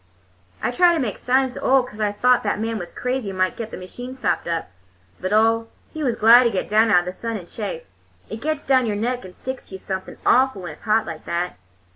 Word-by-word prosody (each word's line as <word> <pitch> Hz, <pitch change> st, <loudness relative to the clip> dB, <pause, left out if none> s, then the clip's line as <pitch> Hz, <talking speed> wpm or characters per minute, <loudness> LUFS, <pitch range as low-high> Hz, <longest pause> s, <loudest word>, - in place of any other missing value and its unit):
"I -, -, +1 dB
tried 345 Hz, +6 st, +4 dB
to -, -, 0 dB
make 230 Hz, -8 st, -2 dB
signs 260 Hz, 0 st, +1 dB
to -, -, -7 dB
Ole, 265 Hz, -1 st, +4 dB
'cause 215 Hz, -4 st, -11 dB
I 210 Hz, -1 st, +1 dB
thought 250 Hz, +4 st, +3 dB
that 205 Hz, -1 st, -1 dB
man 225 Hz, 0 st, -2 dB
was 175 Hz, -1 st, -7 dB
crazy 250 Hz, -4 st, -2 dB
and 190 Hz, -, -6 dB
might 185 Hz, 0 st, +1 dB
get 230 Hz, -2 st, -5 dB
the -, -, -7 dB
machine 245 Hz, +8 st, -8 dB
stopped 190 Hz, -11 st, -1 dB
up. 165 Hz, -, -2 dB, 0.5 s
But 185 Hz, -, -3 dB
Ole, 225 Hz, +1 st, +3 dB, 0.2 s
he 315 Hz, -, -5 dB
was 245 Hz, -4 st, +1 dB
glad 230 Hz, +3 st, +8 dB
to -, -, +4 dB
get 195 Hz, -, -2 dB
down 220 Hz, +2 st, +4 dB
out 180 Hz, -4 st, +5 dB
of -, -, -10 dB
the 180 Hz, -, -4 dB
sun 230 Hz, +2 st, -4 dB
and 175 Hz, -4 st, -10 dB
chaff—it 95 Hz, -, -8 dB
gets 310 Hz, 0 st, -2 dB
down 260 Hz, -3 st, +3 dB
your 210 Hz, -, -1 dB
neck 245 Hz, +4 st, -2 dB
and 180 Hz, -, -12 dB
sticks 260 Hz, 0 st, -6 dB
to 190 Hz, -, -9 dB
you -, -, -5 dB
something 190 Hz, 0 st, -6 dB
awful 255 Hz, -6 st, +3 dB
when 175 Hz, -, -5 dB
it's 150 Hz, -, -14 dB
hot 220 Hz, 0 st, +3 dB
like 165 Hz, -4 st, -8 dB
that. 170 Hz, -, -3 dB
220 Hz, 250 wpm, -22 LUFS, 185-250 Hz, 0.5 s, glad